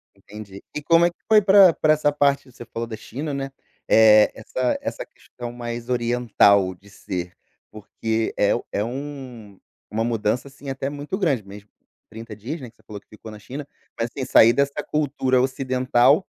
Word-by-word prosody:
Entendi. 100 0 -12
E 150 - -3
como 165 +3 +4
é - - +3
que 175 - -18
foi 215 -1 +6
pra 195 -3 +7
pra 155 0 +3
essa 145 -1 +1
parte 140 -2 +1
você 120 - -11
falou 115 0 -5
da 110 - -6
China, 145 +7 -6
né, 135 0 -4 0.4
Eh, 110 -1 +6
essa 125 +3 -2
essa - - -5
questão 120 -1 -10
mais 120 0 -6
oriental 115 -6 +3
de 100 +3 -20
ser, 90 -2 -6 0.4
porque 110 +1 -3
é 100 - +3
u - - -4
é 100 - -1
um 125 -5 -8 0.3
uma 110 +1 -1
mudança, 115 +2 -1
assim, 140 0 -11
até 135 0 -3
muito 145 +6 -5
grande 140 - 0
mesmo 100 +1 -12 0.4
30 115 0 -9
dias, 135 +9 -6
né, 125 - -8
que 115 - -27
você - - -28
falou 105 -1 -9
que - - -40
ficou 110 +1 -12
na 105 - -11
China, 135 +7 -8 0.3
mas 115 - -1
tem 135 - -5
saí 115 -2 +6
dessa 140 +3 0
cultura 135 -4 0
ocidental 130 +3 +2
120 Hz, 185 wpm, -22 LUFS, 110-140 Hz, 0.4 s, pra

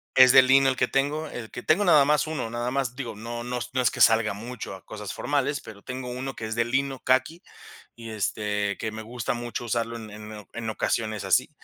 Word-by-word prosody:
es 130 -1 +8
de - - +10
lino 135 +1 +5
el 130 - +2
que 125 - +1
tengo, 145 +3 0
el 115 -3 -7
que 125 - -7
tengo 195 +6 +3
nada 150 -5 +7
más 150 +2 +2
1, 155 -7 -3
nada 120 +1 -2
más. 130 -3 -1
Digo, 120 -5 -5
no 120 +2 -6
no 125 0 -3
no 130 - +1
es 125 - +3
que - - -4
salga 110 -2 +5
mucho 115 0 -7
a 95 - -14
cosas 105 -2 -7
formales, 145 0 -1
pero 105 -2 -12
tengo 125 -1 -5
1 130 +2 -5
que 110 - -6
es 110 - -4
de 115 0 +2
lino, 135 +2 -1
caqui, 130 +7 +1 0.5
y, 115 -1 -9
este, 105 -1 -1
que 110 - -3
me 110 0 -7
gusta 120 +2 -3
mucho 120 0 -5
usarlo 115 0 -1
en 110 -2 -8
en 105 0 -9
en 115 -1 -4
ocasiones 110 -1 -1
así. - - +2
120 Hz, 230 wpm, -26 LUFS, 110-130 Hz, 0.5 s, de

